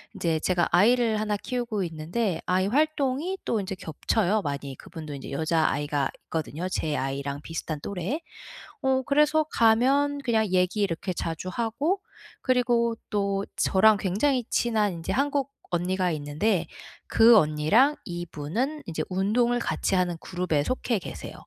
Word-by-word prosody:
인제 160 -2 0
제가 175 0 +1
아이를 225 +3 +4
1 210 -1 0
키우고 235 -2 -2
있는데 170 +3 -2
아이 185 +1 +1
활동이 300 - 0
또 225 - 0
인제 195 -1 -4
겹쳐요, 190 +4 0
많이. 140 -3 -4
그분도 155 0 -9
인제 135 - -8
여자아이가 145 -2 0
있거든요, 160 +2 -4
제 155 -2 -1
아이랑 140 +1 -3
비슷한 160 -1 -5
또래. 200 - -3 0.6
어 265 0 +2
그래서 300 +3 +3
가면 270 +6 +3
그냥 225 -4 +2
얘기 185 +3 +1
이렇게 185 -1 -1
자주 165 +1 -4
하고 275 - -1 0.4
그리고 240 -2 +2
또 200 -1 0
저랑 215 +2 +4
굉장히 230 +7 +1
친한 215 -4 +1
인제 165 -1 -5
한국 280 0 0 0.2
언니가 180 +1 0
있는데 160 +5 0 0.4
그 230 +1 +7
언니랑 155 - +3
이분은 175 - -3
인제 160 -2 -3
운동을 215 +6 +1
같이 215 - -1
하는 180 -2 +1
그룹에 175 -5 -1
속해 240 - -1
계세요. 180 - -8
195 Hz, 310 characters per minute, -26 LUFS, 165-240 Hz, 0.6 s, 그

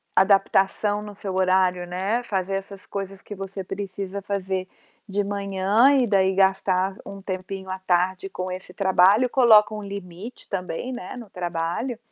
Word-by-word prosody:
adaptação 195 +1 +3
no 210 -1 -9
seu 195 -1 -5
horário, 185 -1 +2
né, 195 +7 -1
fazer 195 -3 -2
essas 195 0 -7
coisas 195 -1 -6
que - - -9
você 195 0 -6
precisa 195 0 -5
fazer 190 -2 -2 0.4
de 205 0 0
manhã 200 +6 +3
e 245 - +2
daí 190 -2 +3
gastar 190 0 +2
um 195 0 -8
tempinho 190 0 -5
à 185 0 -4
tarde 185 +1 0
com 185 -1 -4
esse 185 0 -7
trabalho, 195 +5 +4
coloca 220 -5 +6
um 210 -1 -5
limite 200 +2 -8
também, 180 +5 -3
né, 245 - -7
no 230 -4 -9
trabalho, 175 +7 -3
195 Hz, 155 wpm, -24 LUFS, 185-205 Hz, 0.4 s, coloca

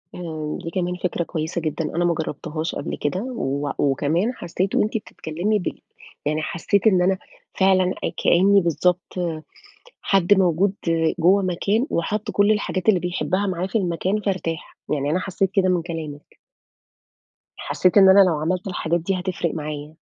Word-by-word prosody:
آآ 155 -3 -5
دي 165 - -4
كمان 180 0 -1
فكرة 175 -1 0
كويسة 165 +1 -3
جدًا 155 +1 -2
أنا 175 +1 +1
ما 175 - +3
جربتهاش 160 +1 -4
قبل 145 - -4
كده، 150 +5 -1
و 145 - -2
وكمان 155 - +1
حسيت 185 -2 -3
وأنتِ 215 +2 +1
بتتكلمي 200 +1 -2
بال 180 - -5 0.4
يعني 155 +1 0
حسيت 185 +6 0
إن 185 -4 +4
أنا 190 +1 +2 0.4
فعلًا 190 -1 +3 0.3
كأني 195 +3 +5
بالضبط 175 +2 0 0.9
حد 195 0 +3
موجود 190 0 +2 0.5
جوّه 185 +4 +5
مكان 200 +7 0
وحَط 205 +5 -2
كل 205 +1 +3
الحاجات 205 -1 0
اللي 190 -4 +4
بيحبها 185 +3 -1
معاه 185 -1 -2
في 195 - 0
المكان 185 +2 -1
فارتاح، 185 -5 -3 0.2
يعني 145 -1 -1
أنا 180 - +1
حسيت 190 0 -1
كده 190 -2 +3
من 180 -2 +2
كلامِك. 160 -3 -7 1.2
حسيت 185 +2 +1
إن 190 -1 +8
أنا 190 +1 +8
لو 175 -5 +3
عملت 180 +4 -1
الحاجات 170 -2 -1
دي 185 +3 -1
هتفرِق 180 -3 -2
معايا. 150 0 -6
180 Hz, 155 wpm, -22 LUFS, 160-195 Hz, 1.2 s, إن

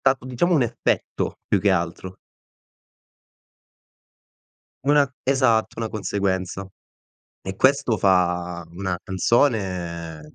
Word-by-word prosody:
stato 135 -1 +2
diciamo 150 +8 +1
un 140 - +4
effetto, 120 -1 -1
più 100 - +2
che 100 0 +3
altro. 90 +1 -2 2.7
Una 145 -1 +3
esatto, 125 -4 +2
una 115 - -2
conseguenza. 100 -3 -2 0.8
E 95 0 -6
questo 135 -4 +3
fa 90 -2 +1
una 90 0 -3
canzone 90 - -1
100 Hz, 95 wpm, -23 LUFS, 90-125 Hz, 2.7 s, un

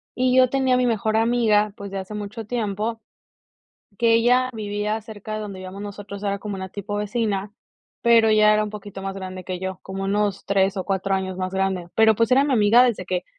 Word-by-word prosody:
y 255 0 +2
yo 255 -1 +6
tenía 265 -1 +2
mi 250 -1 +2
mejor 220 -1 0
amiga, 220 -3 +2
pues, 200 0 -7
de 195 - -3
hace 190 +2 -7
mucho 210 +2 -6
tiempo 220 0 -2 1.0
que 230 -1 +4
ella 245 +2 +3
vivía 210 0 -2
cerca 215 -1 -8
de 215 - -3
donde 200 -3 -7
vivíamos 185 +2 -8
nosotros, 205 0 -8
era 200 -1 -1
como 205 0 -5
una 190 -1 -6
tipo 205 +1 -6
vecina, 210 -2 -2 0.5
pero 230 -2 +5
ella 215 0 +5
era 215 0 +2
un 210 - -6
poquito 205 -2 -8
más 195 0 -4
grande 185 -1 -7
que 185 0 -4
yo, 190 -1 -4
como 195 0 -5
unos 200 0 -1
3 195 0 +1
o 185 - -3
4 195 0 -1
años 190 -1 -3
más 185 0 -3
grande, 190 -2 -1
pero 220 0 +5
pues 230 +3 +1
era 265 +2 +6
mi 285 -2 +1
amiga 220 +2 +6
desde 235 -7 +1
que 180 0 -2
205 Hz, 215 wpm, -23 LUFS, 195-225 Hz, 1.0 s, yo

